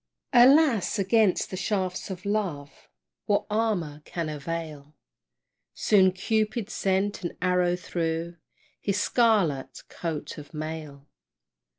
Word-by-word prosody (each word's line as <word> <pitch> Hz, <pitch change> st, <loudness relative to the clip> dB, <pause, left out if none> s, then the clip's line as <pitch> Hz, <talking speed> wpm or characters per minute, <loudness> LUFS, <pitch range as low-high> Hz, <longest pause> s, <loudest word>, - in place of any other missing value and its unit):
Alas! 255 Hz, -, +5 dB
against 200 Hz, 0 st, +2 dB
the -, -, -3 dB
shafts 185 Hz, 0 st, -2 dB
of 190 Hz, 0 st, -7 dB
love, 185 Hz, -9 st, -3 dB, 0.4 s
What 205 Hz, -, +2 dB
armor 195 Hz, -9 st, -1 dB
can 165 Hz, -1 st, -4 dB
avail? 150 Hz, -1 st, -6 dB, 0.8 s
Soon 190 Hz, -3 st, +4 dB
Cupid 215 Hz, +3 st, -1 dB
sent 195 Hz, +1 st, 0 dB
an 175 Hz, -, -5 dB
arrow 180 Hz, 0 st, +2 dB
through 170 Hz, -1 st, -3 dB, 0.4 s
His 200 Hz, 0 st, -1 dB
scarlet 205 Hz, -, +1 dB
coat 160 Hz, -3 st, -5 dB
of 145 Hz, +2 st, -12 dB
mail. 155 Hz, -2 st, -6 dB
180 Hz, 105 wpm, -26 LUFS, 160-210 Hz, 0.8 s, Alas